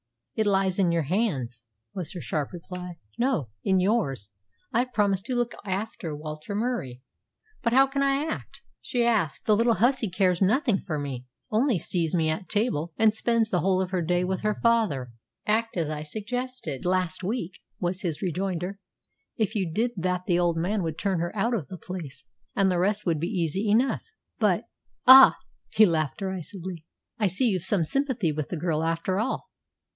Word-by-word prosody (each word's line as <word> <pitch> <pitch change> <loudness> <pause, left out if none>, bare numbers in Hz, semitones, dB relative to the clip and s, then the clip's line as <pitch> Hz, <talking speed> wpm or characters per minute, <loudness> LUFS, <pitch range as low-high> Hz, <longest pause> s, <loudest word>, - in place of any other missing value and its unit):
"It 220 -1 0
lies 195 -1 +2
in 180 -3 +3
your 170 -1 +1
hands," 135 - -1 0.3
was 180 -5 -5
her 180 - -6
sharp 150 -3 -2
reply. 180 0 -7 0.2
"No; 235 - +1
in 190 -1 +3
yours. 180 - 0 0.4
I 230 - +3
have 250 0 -1
promised 200 -2 +1
to 255 - -2
look 240 -1 0
after 195 -4 -3
Walter 155 +5 -6
Murie." 205 - -2 0.6
"But 235 -2 +1
how 270 +2 +7
can 275 +1 -2
I 275 +1 +2
act?" 320 - -6 0.2
she 240 -2 0
asked. 210 -10 +1
"The 215 - +4
little 230 +1 +3
hussy 240 +1 +2
cares 180 -1 +1
nothing 220 +1 +3
for 155 -4 -1
me 135 -3 -5 0.2
only 230 +1 +3
sees 170 0 -1
me 160 -2 +2
at 155 +4 -3
table, 205 -7 0
and 220 -1 +4
spends 225 0 +1
the 180 - +2
whole 185 +2 +2
of 185 -1 -2
her 185 -2 0
day 175 +2 +1
with 185 +1 -1
her 215 -1 0
father." 210 - +1 0.3
"Act 225 0 +1
as 165 -3 0
I 150 -1 -3
suggested 230 - -4
last 185 0 0
week," 190 -3 -3 0.2
was 180 +1 -2
his 170 -5 -3
rejoinder. 185 +1 -2 0.6
"If 215 -2 0
you 190 -7 -1
did 230 +8 0
that 180 0 -1
the 175 -2 +2
old 170 -2 +2
man 195 +5 0
would 160 -2 -3
turn 190 0 0
her 170 +4 -3
out 230 +4 +1
of 180 - -2
the 185 - -8
place, 155 -5 -8 0.3
and 195 -2 +3
the 180 - +1
rest 205 +3 +1
would 165 -4 +1
be 170 - -1
easy 185 +2 -1
enough." 240 +6 +3 0.4
"But - - +2 0.2
" - - -44
"Ah!" 265 +1 +10 0.3
he 215 - +6
laughed 155 -6 0
derisively, 185 -2 -6 0.3
"I 210 - +3
see 190 +8 0
you've 190 -7 +1
some 190 -3 +4
sympathy 250 - 0
with 150 -1 -4
the 175 - -3
girl 160 -1 0
after 165 +4 0
all. 245 +5 -2
185 Hz, 190 wpm, -26 LUFS, 165-220 Hz, 0.6 s, Ah